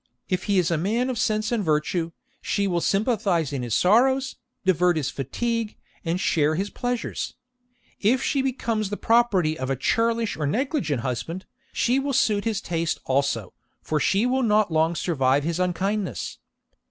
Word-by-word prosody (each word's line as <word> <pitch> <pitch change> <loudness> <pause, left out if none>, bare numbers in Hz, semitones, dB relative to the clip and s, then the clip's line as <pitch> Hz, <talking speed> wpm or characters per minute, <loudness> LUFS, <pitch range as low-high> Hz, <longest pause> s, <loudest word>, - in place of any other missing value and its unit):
If 185 0 -1
he 200 -2 +2
is 180 -1 +2
a 165 - +1
man 230 +9 0
of 240 - -4
sense 215 -1 0
and 230 -3 0
virtue, 165 +1 0 0.3
she 200 - 0
will 175 -3 0
sympathise 195 - +1
in 135 - -2
his 120 -3 -1
sorrows, 260 +7 +3 0.3
divert 180 -2 +3
his 145 -4 -1
fatigue, 230 - -2 0.3
and 170 +1 -1
share 155 -4 +2
his 195 +4 -2
pleasures. 245 -1 -3 0.6
If 245 +5 +2
she 275 - +1
becomes 230 -5 -1
the 205 - -3
property 200 -9 +2
of 130 0 -3
a 135 - +1
churlish 230 - +1
or 150 -2 -2
negligent 185 - -1
husband, 150 +10 -4 0.3
she 250 +3 +2
will 275 0 -2
suit 210 -4 +2
his 220 -3 -1
taste 165 -1 -2
also, 135 -7 0 0.3
for 155 - 0
she 195 +8 +2
will 260 +1 +1
not 215 -5 +3
long 160 +2 +2
survive 140 -5 +1
his 170 +2 -2
unkindness. 190 +3 -2
190 Hz, 165 wpm, -24 LUFS, 160-230 Hz, 0.6 s, sorrows